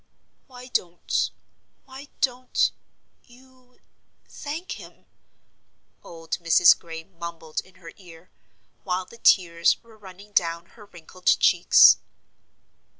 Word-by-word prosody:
"Why 250 -2 -13
don't 175 -7 -2 0.6
why 270 +1 -12
don't 255 -1 0 0.6
you 255 0 -23 0.5
thank 310 +5 -7
him?" - - -15 1.0
old 165 -1 -7
Mrs. 170 0 +5
Gray 165 -1 -9
mumbled 170 -3 -7
in 185 -1 -23
her 170 -3 -13
ear, 175 -2 -16 0.5
while 185 -1 -2
the 235 - -17
tears 170 -6 +3
were 230 -1 -19
running 200 0 -15
down 170 -3 0
her 210 - -15
wrinkled 180 -1 -15
cheeks. - - +6
185 Hz, 105 wpm, -24 LUFS, 170-245 Hz, 1.0 s, cheeks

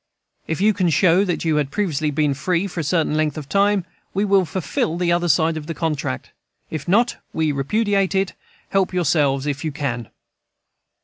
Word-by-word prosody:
If 160 - -2
you 215 +1 +4
can 185 -3 +1
show 175 +4 +4
that 175 -3 -2
you 155 -2 +2
had 145 -2 0
previously 155 -4 -1
been 150 -1 +1
free 170 +6 0
for 180 -3 -5
a - - -1
certain 160 0 +1
length 155 -1 0
of 150 -3 -6
time, 200 0 +2 0.3
we 200 +2 +2
will 195 -2 +3
fulfil 160 0 -2
the 175 -1 +1
other 175 0 +1
side 160 +2 +3
of 150 -1 -7
the 165 - -4
contract. 150 - -3 0.4
If 155 -3 -5
not, 230 +7 +3 0.2
we 160 -1 +1
repudiate 195 +7 +1
it 190 0 +1 0.4
Help 190 -2 +1
yourselves, 145 -5 +2
if 145 0 -2
you 155 - -2
can. 125 -6 -3
165 Hz, 190 wpm, -21 LUFS, 150-190 Hz, 0.4 s, you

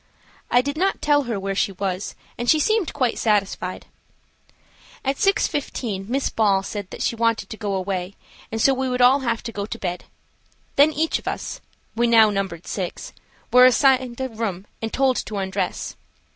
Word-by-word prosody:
I 245 - +5
did 285 +2 -3
not 385 +3 +1
tell 290 -2 +2
her 230 -4 -2
where 195 0 -2
she 195 +1 0
was, 190 0 -3 0.2
and 240 0 -2
she 310 - +5
seemed 435 +3 +1
quite 255 -5 0
satisfied. 210 -3 0 1.2
At 270 +1 0
6.15 260 - -1
Miss 270 +2 0
Ball 200 -3 +2
said 200 -1 -5
that - - -5
she - - 0
wanted 230 -3 0
to - - -4
go 205 -3 -2
away, 185 0 -3 0.4
and 225 - -3
so 270 +4 +5
we 260 0 -1
would 250 0 -1
all 260 +3 +6
have 235 -3 -2
to 230 - -5
go 205 -2 -4
to - - -5
bed. 180 -1 -4 0.7
Then 290 +3 +6
each 315 +2 0
of - - -15
us–we 240 - -4
now 225 -2 +6
numbered 195 -4 -3
six–were 215 +6 0
assigned 255 -1 +3
a 260 - -1
room 210 -5 -4 0.2
and 225 0 -3
told 265 -1 +2
to 210 - -4
undress. 195 0 -3
230 Hz, 175 wpm, -23 LUFS, 195-265 Hz, 1.2 s, all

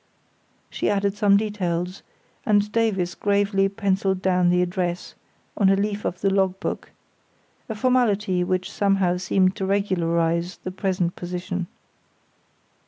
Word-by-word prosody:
She - - -1
added 200 0 0
some 205 -2 +4
details, 185 -3 -2 0.4
and 210 -1 +2
Davies 200 -6 0
gravely 200 -1 +1
pencilled 195 -1 0
down 180 -1 +2
the 180 0 +3
address 175 0 -3 0.4
on 195 -2 +3
a 195 - +5
leaf 205 +1 -2
of 175 - -3
the 195 - +2
log 190 -1 +1
book; - - -4 0.8
a 220 - -3
formality 210 -6 +1
which 185 +1 -1
somehow 195 -3 +1
seemed 185 +1 +1
to 190 - -2
regularise 170 -3 0
the 185 - -6
present 185 -2 -1
position. 180 0 -4
190 Hz, 130 wpm, -23 LUFS, 180-200 Hz, 0.8 s, a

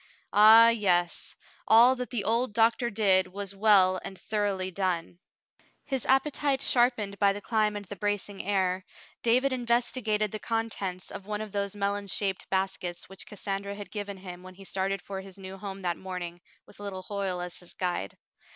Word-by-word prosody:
Ah, 220 +2 +9
yes, 180 -6 +1 0.3
all 240 +4 +7
that 250 -1 -5
the 235 -5 -2
old 230 +1 +1
doctor 230 +1 +3
did 195 -3 +3
was 200 +1 -4
well 195 -3 +4
and 190 - -8
thoroughly 200 -3 -1
done. 180 -2 -2 0.7
His 265 -3 -2
appetite 275 +1 +2
sharpened 240 -5 +2
by 200 -1 +4
the 205 - -6
climb 215 0 0
and 205 0 -5
the 205 - -7
bracing 205 0 -2
air, 190 -1 0 0.4
David 255 +3 +3
investigated 235 -3 0
the 215 - -4
contents 210 -5 -3
of 195 - -8
one 210 0 -3
of 215 -1 -6
those 200 0 -2
melon 200 0 -1
shaped 195 0 -1
baskets 190 -2 -2
which 195 +2 -9
Cassandra 200 -1 -4
had 205 0 -9
given 205 -2 -5
him 180 -2 -9
when 185 0 -12
he 195 +1 -13
started 195 0 -2
for 195 -1 -6
his 190 -1 -11
new 190 0 -8
home 195 0 -7
that 175 -2 -1
morning, 180 -2 -6 0.2
with - - -15
little 195 -2 -6
Hoyle 195 -2 -3
as 180 0 -5
his 180 - -12
guide. 175 - -3
200 Hz, 175 wpm, -28 LUFS, 190-215 Hz, 0.7 s, Ah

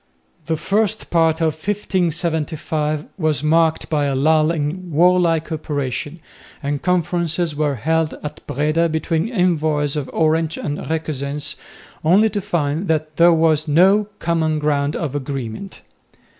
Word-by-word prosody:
The 160 -1 0
first 215 +5 -1
part 165 -1 +2
of 160 -1 +2
1575 160 -4 -1
was 155 -4 0
marked 160 +1 +2
by 150 -2 0
a 140 -1 0
lull 155 +3 +3
in 170 +3 -3
warlike 170 0 +3
operations, 145 0 -3 0.4
and 145 0 -2
conferences 170 -2 0
were 145 -1 0
held 160 +5 0
at 150 - -6
Breda 155 +4 +1
between 160 +4 -1
envoys 155 - +1
of 145 -3 -3
Orange 160 0 +1
and 145 0 -3
Requesens, 150 -1 -3 0.5
only 200 +7 +4
to 205 0 -2
find 170 -2 -1
that 155 -1 -1
there 170 +1 +6
was 160 -1 +2
no 190 +7 +4
common 160 -2 0
ground 150 -1 0
of 150 -5 -3
agreement. 135 - -5
160 Hz, 130 wpm, -20 LUFS, 150-170 Hz, 0.5 s, there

